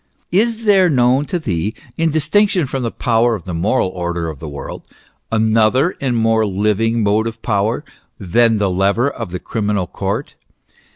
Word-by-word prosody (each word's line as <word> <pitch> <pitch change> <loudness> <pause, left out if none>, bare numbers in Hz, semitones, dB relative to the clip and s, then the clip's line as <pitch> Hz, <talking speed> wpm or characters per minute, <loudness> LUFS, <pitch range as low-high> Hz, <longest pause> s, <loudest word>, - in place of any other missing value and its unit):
Is 225 +4 +1
there 195 -3 +5
known 130 +1 +2
to 180 - -1
thee, 105 - -2 0.2
in 165 0 +1
distinction 170 +4 +2
from 135 0 -3
the 120 - -1
power 115 0 +1
of 95 - -8
the 90 - -6
moral 95 +5 +1
order 85 -2 -3
of 75 -4 -8
the 80 - -7
world, 70 - -8 0.2
" - - -45
another 110 +8 +2
and 125 -4 0
more 115 0 +2
living 105 +3 0
motive 110 +2 0
power 110 +6 0 0.2
" - - -48
than 115 -2 +4
the 100 -2 0
lever 100 +9 +1
of - - -6
the 90 - -4
criminal 105 -1 -2
court - - -4
115 Hz, 175 wpm, -18 LUFS, 100-135 Hz, 0.2 s, there